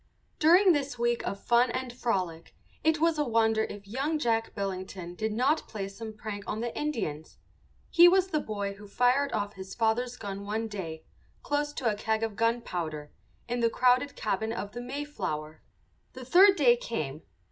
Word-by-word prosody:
During 360 +5 +6
this 280 -5 -1
week 235 0 +1
of 200 - -3
fun 240 +3 +3
and 255 0 -3
frolic 185 -9 -2 0.3
it 320 0 +3
was 325 -1 +2
a - - +3
wonder 225 -3 +2
if 200 -1 -9
young 275 +9 -1
Jack 225 -5 0
Billington 185 -2 -5
did 220 +4 -2
not 260 +8 +1
play 200 -3 -5
some 220 +3 -8
prank 215 -1 -6
on 215 - -3
the 235 0 -3
Indians. 195 - -3 0.5
He 345 +1 +8
was 380 +1 +4
the 310 - +1
boy 200 -5 -3
who 205 +1 -13
fired 250 +6 +2
off 205 -1 -2
his 190 0 -9
father's 240 +2 0
gun 200 -2 -6
one 220 +2 -2
day, 165 -7 -6 0.4
close 290 0 -1
to 255 - -2
a 220 - +3
keg 220 +1 -1
of 225 -2 -2
gunpowder, 175 -10 -2 0.4
in 240 0 -2
the 230 -1 +3
crowded 255 +4 +2
cabin 220 +1 -1
of 205 -3 -4
the 240 - -6
Mayflower. 220 - -5 0.5
The 255 -1 -9
third 385 +8 +7
day 250 -8 +5
came. 155 - -4
225 Hz, 180 wpm, -29 LUFS, 200-260 Hz, 0.5 s, He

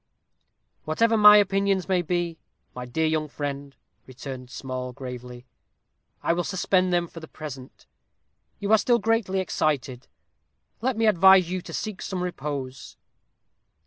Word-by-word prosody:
"Whatever 225 +9 +2
my 210 -1 +9
opinions 195 -1 +1
may 185 -2 +2
be, 175 -1 -2 0.3
my 125 0 -7
dear 160 +7 -1
young 155 -1 0
friend," 140 -1 -6 0.3
returned 130 -1 -8
Small, 130 -1 -6
gravely, 125 -2 -9 0.8
"I - - +2
will 175 +1 -1
suspend 185 0 +1
them 175 -1 +1
for 165 - -11
the 160 - -11
present. 135 -5 -10 0.7
You 205 +1 -3
are 220 - +6
still 240 +3 +3
greatly 225 -5 0
excited. 140 -7 -2 0.7
Let 250 -1 -1
me 225 - +2
advise 190 -3 +6
you 185 0 -2
to - - -10
seek 215 -4 -5
some 185 -2 -4
repose." 140 -6 -6
170 Hz, 140 wpm, -25 LUFS, 135-195 Hz, 0.8 s, my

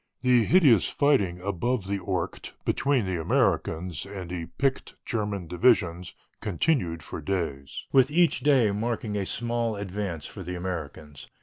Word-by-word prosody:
The 125 -3 +4
hideous 145 - +5
fighting 130 - +2
above 100 +4 -1
the 100 +1 -2
Ourcq 90 -2 -4
between 135 -5 +1
the 90 -3 -2
Americans 80 +1 0
and 95 -3 -7
the 85 -2 -4
picked 135 -1 -1
German 105 -5 -2
divisions 90 -1 +1 0.2
continued 90 - 0
for - - -7
days, 80 -8 -3
with 135 0 +5
each 170 +2 +3
day 135 -8 +4
marking 110 0 -2
a 100 -2 -2
small 120 -1 -1
advance 100 -5 -4
for 100 - -9
the 90 0 -5
Americans. 80 -7 -6
100 Hz, 140 wpm, -27 LUFS, 90-120 Hz, 0.2 s, hideous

